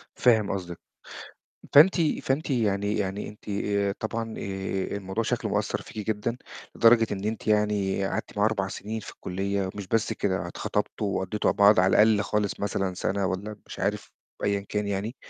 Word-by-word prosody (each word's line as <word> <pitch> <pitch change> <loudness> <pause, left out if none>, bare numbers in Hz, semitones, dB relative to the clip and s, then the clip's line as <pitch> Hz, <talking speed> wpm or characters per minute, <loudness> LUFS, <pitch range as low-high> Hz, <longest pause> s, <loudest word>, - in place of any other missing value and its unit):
فاهم 110 -5 +3
قصدِك، 90 -3 -5 0.9
فأنتِ 170 +5 +7 0.2
فأنتِ 140 +3 -1
يعني 105 -4 +1
يعني 100 0 -2
أنتِ 105 0 -13
آآ، 100 0 0
طبعًا 115 0 -3
آآ، 95 0 -3
الموضوع 95 +3 -3
شكله - - -1
مأثّر - - -1
فيكِ 105 -1 -8
جدًا 110 +3 -2 0.4
لدرجة 115 0 +6
إن 100 0 -4
أنتِ 110 +1 -3
يعني 105 -2 +1
قعدتِ - - -4
معاه 105 - +4
4 100 -3 0
سِنين 110 +3 -5
في - - -9
الكُليّة، 95 +1 -2
مش 100 -2 -6
بس 115 0 +1
كده 95 -5 -1
اتخطبتوا 100 +3 -2
وقضّيتوا 95 +3 0
مع - - -3
بعض 100 -1 +6
على 95 - +4
الأقل 110 -2 +4
خالص 105 -1 -1
مثلًا 95 -2 -1
سَنة 100 +1 -1
والَّا 100 +3 -4
مش - - -9
عارف 100 +2 -2 0.3
ب - - -3
أيًا 100 -1 +1
كان 105 -1 -1
يعني، 100 +5 -3
100 Hz, 175 wpm, -26 LUFS, 95-110 Hz, 0.9 s, فأنتِ